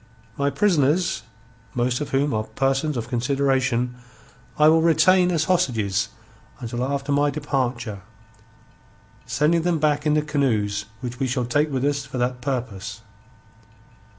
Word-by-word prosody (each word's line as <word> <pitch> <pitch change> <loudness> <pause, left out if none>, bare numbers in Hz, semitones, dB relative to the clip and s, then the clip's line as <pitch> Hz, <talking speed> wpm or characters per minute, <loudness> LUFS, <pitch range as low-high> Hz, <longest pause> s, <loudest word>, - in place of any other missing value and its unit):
My 140 0 +1
prisoners, 155 - +2 0.5
most 125 +1 0
of 145 - -3
whom 140 +1 +1
are 110 0 -1
persons 135 +5 0
of 115 -1 -3
consideration, 130 -1 0 0.6
I 150 - +6
will 160 +1 +5
retain 180 +2 +4
as 165 -3 +1
hostages 115 - +1 0.5
until 120 +1 -3
after 140 +1 -2
my 145 +1 +3
departure, 130 -7 -2 1.3
sending 160 +4 +2
them 175 0 +1
back 150 0 +1
in 150 - +3
the 150 - +2
canoes 110 -9 0 0.2
which 125 0 -6
we 135 - 0
shall 125 -1 -1
take 145 +5 +1
with 135 0 -1
us 145 -1 0
for 140 -1 -7
that 125 0 -1
purpose. 115 -6 -4
135 Hz, 140 wpm, -23 LUFS, 120-150 Hz, 1.3 s, I